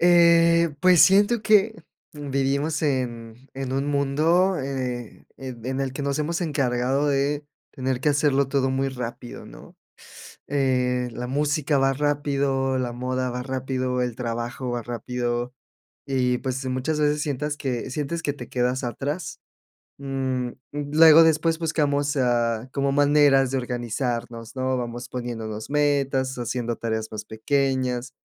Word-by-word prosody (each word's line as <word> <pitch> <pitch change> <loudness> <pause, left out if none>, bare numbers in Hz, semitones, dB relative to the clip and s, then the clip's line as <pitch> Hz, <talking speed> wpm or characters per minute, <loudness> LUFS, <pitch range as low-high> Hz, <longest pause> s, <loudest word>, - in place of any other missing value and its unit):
Eh, 170 -2 +5
pues 180 -1 +6
siento 205 +4 +4
que 215 0 +4 0.4
vivimos 140 +2 -1
en 125 -3 -3
en 135 -1 -4
un 135 +2 -1
mundo, 155 +7 +2
eh, 130 -4 -4
en 130 -4 -8
en 130 +1 -2
el 135 -1 -2
que 140 - -5
nos 140 0 -1
hemos 165 +3 -1
encargado 135 -3 0
de 145 +1 0 0.3
tener 130 -1 -2
que 150 - +1
hacerlo 140 -2 +2
todo 135 -1 +1
muy 135 +1 0
rápido, 125 -2 -7
¿no?, - - -14 0.7
eh, 125 -3 +1
la 120 +2 -5
música 145 +2 0
va 135 0 +3
rápido, 140 -2 0
la 125 -2 -2
moda 130 +1 -2
va 125 +1 -4
rápido, 130 -1 -2
el 125 -2 -2
trabajo 120 +1 -4
va 120 -1 -2
rápido 120 +1 -3 0.5
y, 125 -2 +1
pues, 130 0 -3
muchas 130 +4 -1
veces 150 0 +2
sientas 150 0 -2
que 130 -3 -3
sientes 150 +4 -3
que 145 - -1
te 125 -4 -9
quedas 125 +1 -1
atrás. 145 +7 -4 0.6
Mm, 130 -2 -2 0.2
luego, 155 +2 +6
después 160 +1 +2
buscamos, 145 -3 0
ah, 120 -2 +1
como 140 0 0
maneras 145 -2 +4
de 135 - 0
organizarnos, 120 -1 -4
¿no?, 130 0 0
vamos 120 0 -5
poniéndonos 115 -4 -5
metas, 140 -3 +1
haciendo 120 0 -2
tareas 110 -1 -3
más 105 -1 -6
pequeñas. 130 +2 -1
135 Hz, 140 wpm, -24 LUFS, 125-145 Hz, 0.7 s, pues